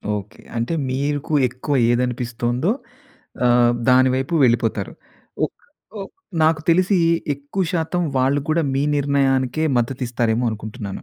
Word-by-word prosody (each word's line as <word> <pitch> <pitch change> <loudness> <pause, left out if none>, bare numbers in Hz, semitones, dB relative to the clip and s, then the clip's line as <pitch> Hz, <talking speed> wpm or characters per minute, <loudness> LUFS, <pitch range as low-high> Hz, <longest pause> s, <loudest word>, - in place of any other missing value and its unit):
Okay. 105 0 -8 0.2
అంటే 115 +8 -1 0.2
మీకు 145 +3 -2 0.2
ఎక్కువ 130 +3 -3 0.2
ఏదనిపిస్తోందో 125 - -1 0.8
ఆహ్, 120 0 +4 0.2
దాని 130 +1 +6
వైపు 135 +6 -2
వెళ్ళిపోతారు. 115 -4 0 0.5
ఓక్ - - -4 0.5
ఓ - - -5 0.4
నాకు 155 0 +3
తెలిసి 185 +3 +3 0.4
ఎక్కువ 145 +7 -4
శాతం 175 +1 -1 0.2
వాళ్ళు 135 +2 +2
కూడా 160 +1 +2
మీ 135 - +1
నిర్ణయానికే 140 0 +1
మద్దతు 120 +2 -1
ఇస్తారేమో 120 0 0
అనుకుంటున్నాను. 105 -1 -7
130 Hz, 120 wpm, -21 LUFS, 120-145 Hz, 0.8 s, దాని